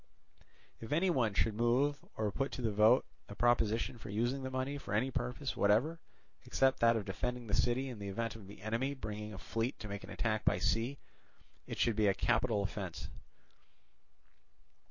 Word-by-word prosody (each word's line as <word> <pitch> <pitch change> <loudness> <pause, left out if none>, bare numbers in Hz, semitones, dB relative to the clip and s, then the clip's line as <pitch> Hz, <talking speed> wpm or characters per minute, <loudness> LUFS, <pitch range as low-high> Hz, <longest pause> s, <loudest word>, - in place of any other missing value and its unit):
If 115 - -8
any 175 +5 +3
one 115 -10 +1
should 110 - +2
move 125 +6 +2
or 105 -2 0
put 135 +6 -1
to 125 - -4
the 110 - +1
vote 110 +5 +5 0.2
a 100 - -7
proposition 115 +1 +2
for 110 - -9
using 120 +6 0
the 130 - -3
money 130 +2 -2
for 105 - -3
any 125 +5 +1
purpose 60 - -2
whatever 115 +12 +3 0.4
except 135 0 +2
that 115 0 +5
of 110 -3 -1
defending 125 +5 -3
the 105 - -6
city 125 +5 +2
in 120 -5 -7
the 100 - -5
event 115 +3 -2
of 105 -4 -11
the 100 0 -12
enemy 120 +6 -1
bringing 105 -3 -5
a 100 - -7
fleet 115 +6 -2
to 105 - -7
make 100 0 -5
an - - -10
attack 110 -2 -1
by - - +3
sea, 120 +5 0 0.7
it - - -5
should 115 -3 +2
be 105 -1 +3
a 100 - +3
capital 110 -1 +2
offence. 100 -3 -5
115 Hz, 190 wpm, -34 LUFS, 105-130 Hz, 0.7 s, vote